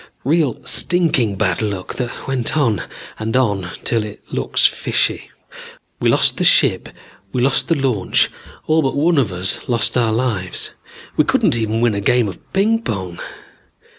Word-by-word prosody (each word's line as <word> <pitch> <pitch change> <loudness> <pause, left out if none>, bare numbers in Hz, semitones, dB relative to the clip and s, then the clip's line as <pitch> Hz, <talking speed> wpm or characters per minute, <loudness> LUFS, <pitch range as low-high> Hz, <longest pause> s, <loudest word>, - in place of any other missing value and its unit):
Real 150 -2 +1
stinking 150 - +2
bad 95 -2 0
luck 100 -4 -3
that 125 -2 -5
went 135 +2 -1
on 120 -8 +1 0.4
and 110 +3 -1
on 100 -8 0
till 115 -2 +1
it 105 -1 -9
looks - - +1
fishy. - - 0 0.7
We - - +2
lost - - +3
the - - 0
ship, - - +3 0.4
we 125 - -2
lost 135 +1 +1
the 165 - +2
launch, 130 -9 +1 0.3
all 160 +1 +3
but 135 -3 -1
one 155 +2 +3
of 115 -8 0
us 90 +1 0
lost 120 -2 +1
our 120 -3 +2
lives. 110 -6 -2 0.5
We - - +5
couldn't - - +2
even 110 0 -1
win 120 -2 +3
a 100 - -2
game 120 +2 +2
of 95 - -7
ping 220 +4 +2
pong. 95 - -5
115 Hz, 165 wpm, -18 LUFS, 100-135 Hz, 0.7 s, We